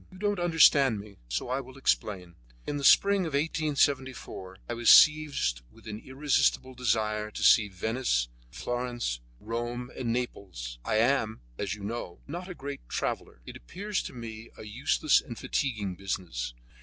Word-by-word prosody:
You 185 - -13
don't 205 0 0
understand 150 -8 +5
me, 100 -1 -11
so - - -2
I 130 +2 0
will 130 0 -13
explain: 95 -9 -1 0.3
In 145 - -2
the 140 - -4
spring 200 +3 +5
of 155 - -6
1874 140 - -1
I 120 - -3
was 120 0 +2
seized 150 - +6
with - - -19
an 105 -1 -6
irresistible 130 0 +1
desire 110 -3 0
to - - -6
see 110 -2 +6
Venice, 100 - 0 0.2
Florence, 120 - -3 0.2
Rome 120 +2 -4
and 120 -3 -2
Naples. 95 - -4
I - - -1
am, 110 -1 +2 0.2
as 100 0 -2
you 105 - -11
know, 105 -4 -5
not 175 +6 -6
a 180 - -6
great 140 -1 -6
traveller; - - -3
it - - -9
appears 205 +3 -4
to - - -7
me 115 -2 -8
a - - -9
useless 130 +7 +2
and 120 -6 -9
fatiguing 110 -9 -2
business. 85 -11 -4
120 Hz, 160 wpm, -29 LUFS, 105-140 Hz, 0.3 s, seized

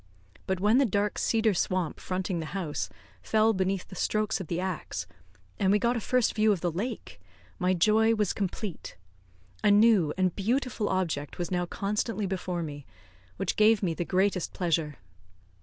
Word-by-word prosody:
But 190 -1 0
when 210 +6 +4
the 275 - +4
dark 205 0 0
cedar 220 -2 +2
swamp 180 -2 -1
fronting 185 -1 -2
the 160 - -4
house 150 - -3 0.3
fell 220 - +3
beneath 190 -1 -1
the - - -13
strokes 215 +1 0
of 180 - -7
the 170 +2 -2
axe, 180 - -3 0.5
and 190 - +3
we 205 - +5
got 235 +3 +1
a - - 0
first 250 +2 +1
view 215 -1 +3
of 190 -5 0
the 175 - 0
lake, 210 - -5 0.4
my 185 +1 +2
joy 220 +5 +4
was 210 -4 0
complete; 195 -2 -4 0.7
a 210 - +5
new 205 -6 +5
and 185 -2 +1
beautiful 230 +1 -1
object 165 -7 -2
was 175 0 -3
now 180 -1 0
constantly 210 +3 -2
before 180 -2 -3
me, 145 -2 -7 0.5
which - - -1
gave 215 -1 +4
me 170 -3 +1
the 175 - -2
greatest 185 0 0
pleasure. 160 -5 -1
190 Hz, 175 wpm, -28 LUFS, 175-215 Hz, 0.7 s, we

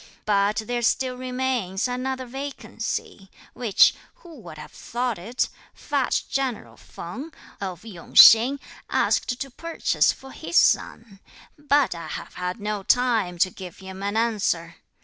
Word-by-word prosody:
But 205 +1 +1
there 240 +1 -2
still 255 +2 +1
remains 250 -6 -2
another 255 +1 -3
vacancy, 245 -6 -6 0.2
which, 230 -5 +4 0.2
who 345 -10 -14
would - - -11
have - - -10
thought 240 -4 -3
it, 230 +8 -1 0.3
fat 280 -3 -1
general 265 -4 -3
Feng, 255 - -9 0.3
of 190 +1 -6
Yung 185 -7 -11
Hsing, 245 +5 +9 0.3
asked 245 0 +1
to 275 - -5
purchase 330 +6 +1
for 265 0 -12
his 340 - -3
son; 210 -4 +2 0.4
but 290 -2 +2
I 165 -2 -8
have - - -7
had 180 +4 -4
no 210 0 -3
time 225 -5 +1
to 185 +2 +2
give 180 -2 -10
him 190 0 -10
an 205 +2 -2
answer. 200 -7 0
235 Hz, 140 wpm, -24 LUFS, 195-260 Hz, 0.4 s, Hsing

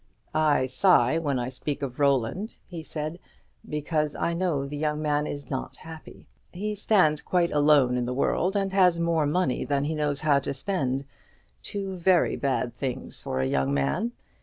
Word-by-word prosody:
"I 155 -4 +3
sigh 130 0 +3
when 145 -5 -1
I 125 0 -2
speak 140 +3 -4
of 130 -1 -5
Roland," 140 - +1
he 170 -3 -7
said, 155 +2 -5 0.5
"because 150 0 -1
I 170 - -1
know 170 -6 0
the 140 +2 -6
young 150 0 -1
man 150 -1 0
is 145 0 -6
not 130 - -4
happy. 160 -1 -11 0.3
He 210 +4 -3
stands 190 -7 +2
quite 175 -2 +1
alone 145 -4 +4
in 120 -1 -1
the 125 - -2
world, 180 +7 +1
and 195 -1 0
has 180 -3 +4
more 165 -3 +1
money 150 -3 0
than 140 -1 0
he 155 +2 -1
knows 150 -2 -1
how 145 -3 +4
to 140 - -4
spend; 135 -4 -1 0.6
two 195 -2 -5
very 180 0 +3
bad 130 -4 -1
things 125 +1 -5
for 65 - -3
a - - +1
young 65 +1 +1
man. 70 - 0
150 Hz, 180 wpm, -26 LUFS, 135-170 Hz, 0.6 s, alone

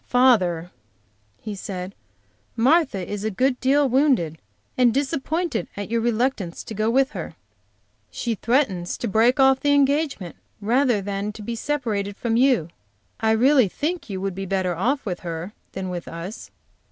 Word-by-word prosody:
"Father," 185 -10 +3 0.7
he 215 - -6
said, 190 -1 -6 0.6
"Martha 250 - +2
is 205 0 -4
a 220 - 0
good 250 +5 +1
deal 275 +2 +3
wounded 250 - +2 0.4
and 250 -2 +4
disappointed, 290 - -1
at 205 +2 -5
your 230 0 +1
reluctance 230 -6 -1
to, - - -8
go 215 +1 0
with 265 +4 +3
her. - - -6 0.7
She 235 - -2
threatened 215 -6 0
to 235 - -3
break 230 +6 +3
off 265 0 +5
her 290 - +1
engagement 285 - +1 0.2
rather 235 0 +2
than 200 +1 -3
to 210 - -9
be 235 +3 -4
separated 220 -7 -2
from 230 -2 -1
you. 245 - +3 0.5
I 220 - +1
really 255 +1 +5
think 315 - -3
you 190 -2 -4
would 195 0 -2
be 195 +1 -5
better 185 -2 0
off 260 - 0
with 180 -4 -3
her 170 +3 -6 0.2
than 190 -1 -4
with 175 -1 -5
us. 170 +6 -7
225 Hz, 160 wpm, -23 LUFS, 195-265 Hz, 0.7 s, off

